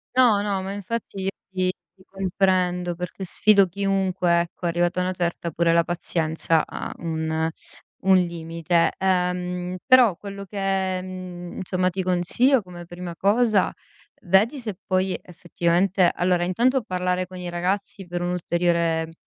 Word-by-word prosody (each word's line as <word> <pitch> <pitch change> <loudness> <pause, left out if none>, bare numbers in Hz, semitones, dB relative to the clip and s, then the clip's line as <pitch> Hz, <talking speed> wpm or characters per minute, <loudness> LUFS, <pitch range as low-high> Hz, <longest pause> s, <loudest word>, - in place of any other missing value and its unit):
No, 240 -6 +5
no, 200 -2 -1
ma 195 +1 -4
infatti 205 0 -5
i - - +3 0.2
ti 185 -1 0 0.3
ti - - -18
comprendo 185 -2 0
perché 180 +2 -6
sfido 200 +1 +4
chiunque, 190 -2 +1
ecco, 175 +1 -7
arrivata 175 +1 0
a - - +1
una 185 - -1
certa, 170 -1 -2
pure 170 +2 +2
la 170 0 +4
pazienza 165 -2 0
ha - - -6
un 160 -1 -1 0.6
un 190 0 +6
limite. 170 -1 0
Ehm, 180 -1 -1
però 245 -8 +6
quello 200 +1 -8
che, 195 -2 -1
mhmm, 185 -1 -8
insomma, 185 -1 0
ti 190 +1 -3
consiglio 185 +9 +4
come 175 -2 -10
prima 175 0 -7
cosa, 210 +1 +2 0.5
vedi 205 +9 +3
se 220 -7 -5
puoi 185 0 0
effettivamente 175 +2 +1
allora 180 0 +1
intanto 245 +9 +2
parlare 180 -3 -1
con 185 0 -10
i 180 -1 -5
ragazzi 185 +2 -2
per 175 0 -4
un'ulteriore 170 -2 0
180 Hz, 145 wpm, -24 LUFS, 175-195 Hz, 0.6 s, un